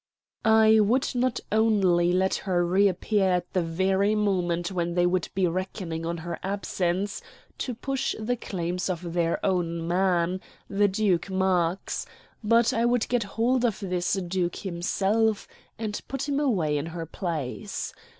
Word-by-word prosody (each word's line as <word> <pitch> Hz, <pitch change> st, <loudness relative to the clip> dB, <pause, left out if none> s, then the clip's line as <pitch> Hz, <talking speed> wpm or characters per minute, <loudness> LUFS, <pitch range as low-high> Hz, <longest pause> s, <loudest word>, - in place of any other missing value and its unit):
I 220 Hz, -1 st, +6 dB
would 230 Hz, +5 st, +2 dB
not 250 Hz, 0 st, 0 dB
only 195 Hz, -6 st, +3 dB
let 190 Hz, +1 st, +2 dB
her 180 Hz, -2 st, 0 dB
reappear 195 Hz, +2 st, +2 dB
at 180 Hz, -1 st, -1 dB
the 185 Hz, -, +2 dB
very 190 Hz, +5 st, +1 dB
moment 180 Hz, -4 st, 0 dB
when 175 Hz, -2 st, -2 dB
they 175 Hz, 0 st, +3 dB
would 180 Hz, -1 st, 0 dB
be 190 Hz, -1 st, +2 dB
reckoning 175 Hz, -2 st, -3 dB
on 170 Hz, 0 st, -2 dB
her 170 Hz, -1 st, -4 dB
absence 190 Hz, 0 st, -2 dB, 0.4 s
to 250 Hz, -, -3 dB
push 270 Hz, +3 st, -2 dB
the 230 Hz, +3 st, -1 dB
claims 180 Hz, -4 st, -3 dB
of 175 Hz, -1 st, -4 dB
their 170 Hz, -1 st, +1 dB
own 170 Hz, -3 st, 0 dB
man, 180 Hz, 0 st, +1 dB, 0.3 s
the 205 Hz, +1 st, +2 dB
Duke 195 Hz, -2 st, +1 dB
Marx; 185 Hz, -2 st, 0 dB, 0.4 s
but 230 Hz, +2 st, +4 dB
I 230 Hz, -, +1 dB
would 240 Hz, -1 st, +2 dB
get 245 Hz, -1 st, +2 dB, 0.2 s
hold 245 Hz, +2 st, +2 dB
of 230 Hz, -5 st, +1 dB
this 180 Hz, -3 st, -1 dB
duke 180 Hz, -2 st, -1 dB
himself 200 Hz, +4 st, 0 dB, 0.3 s
and 215 Hz, -2 st, -4 dB
put 270 Hz, +1 st, -3 dB
him 285 Hz, -1 st, 0 dB
away 175 Hz, -, +1 dB
in 145 Hz, -, -4 dB
her 165 Hz, 0 st, -5 dB
place. 165 Hz, +2 st, -4 dB
190 Hz, 150 wpm, -26 LUFS, 175-215 Hz, 0.4 s, I